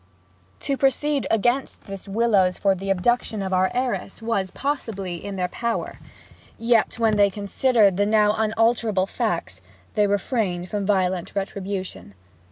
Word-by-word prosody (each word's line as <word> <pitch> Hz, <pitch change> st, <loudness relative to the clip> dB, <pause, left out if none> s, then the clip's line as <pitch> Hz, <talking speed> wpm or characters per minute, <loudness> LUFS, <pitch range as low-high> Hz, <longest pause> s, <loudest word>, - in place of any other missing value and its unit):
To 275 Hz, -1 st, -1 dB
proceed 275 Hz, +1 st, +1 dB
against 240 Hz, +5 st, 0 dB
this 195 Hz, -1 st, -8 dB
Willowes 200 Hz, -3 st, +2 dB
for 195 Hz, -1 st, +3 dB
the 195 Hz, +1 st, -5 dB
abduction 210 Hz, +2 st, +1 dB
of 190 Hz, 0 st, -3 dB
our 185 Hz, 0 st, +3 dB
heiress 250 Hz, 0 st, -2 dB
was, 225 Hz, -5 st, -1 dB
possibly, 200 Hz, -, -3 dB
in 200 Hz, -1 st, -5 dB
their 180 Hz, -1 st, -1 dB
power; 235 Hz, +5 st, -3 dB, 0.6 s
yet, 230 Hz, -1 st, +2 dB
when 225 Hz, -2 st, +2 dB
they 200 Hz, -1 st, +5 dB
considered 205 Hz, 0 st, +2 dB
the 205 Hz, 0 st, +2 dB
now 210 Hz, -1 st, +4 dB
unalterable 220 Hz, -2 st, +1 dB
facts, 175 Hz, -, -3 dB, 0.3 s
they 210 Hz, -1 st, +3 dB
refrained 200 Hz, -3 st, -1 dB
from 205 Hz, -2 st, -2 dB
violent 185 Hz, -3 st, 0 dB
retribution. 195 Hz, -, -4 dB
205 Hz, 140 wpm, -23 LUFS, 190-230 Hz, 0.6 s, they